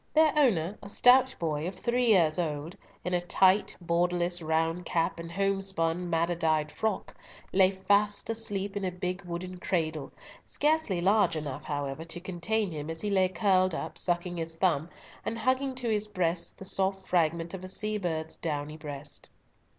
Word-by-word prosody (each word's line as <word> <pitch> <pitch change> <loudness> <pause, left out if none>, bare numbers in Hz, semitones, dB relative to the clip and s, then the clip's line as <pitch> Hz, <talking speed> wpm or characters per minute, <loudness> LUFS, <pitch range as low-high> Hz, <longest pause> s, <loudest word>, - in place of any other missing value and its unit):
Their 310 -2 +5
owner, 210 - +2
a 200 - -9
stout 260 +4 +5
boy 155 -1 -2
of 185 - -5
three 240 +5 0
years 175 -6 +4
old, 155 0 -3 0.3
in 180 - -1
a 175 - +2
tight, 190 +3 +3
borderless, 175 0 0
round 165 +2 0
cap, 165 0 0
and 165 0 -7
home 195 +1 0
spun, 175 -2 -1
madder 170 +1 +1
dyed 155 -2 +1
frock, 220 -2 -2 0.4
lay 190 -1 +6
fast 200 +2 +2
asleep 205 -3 -2
in 200 - -2
a 185 - +1
big 180 +1 -3
wooden 180 +1 -6
cradle, 160 -6 -2 0.3
scarcely 300 - +1
large 200 0 +3
enough, 150 -2 -5
however, 145 +1 -3
to 170 +1 -5
contain 185 +3 -1
him, 150 -1 -5
as 160 0 -5
he 210 - -2
lay 190 -2 +3
curled 185 -1 +2
up, - - -5
sucking 175 0 -1
his 165 0 -4
thumb, 165 -3 +1 0.3
and 230 - -3
hugging 260 +3 0
to 250 -1 -3
his 215 -1 0
breast 180 -4 -1
the 190 - -8
soft 190 0 0
fragment 170 0 +1
of 190 -1 -6
a - - -6
sea 210 +3 -2
bird's 160 -4 -3
downy 150 -1 -3
breast. 145 -2 -8
180 Hz, 175 wpm, -29 LUFS, 165-200 Hz, 0.4 s, lay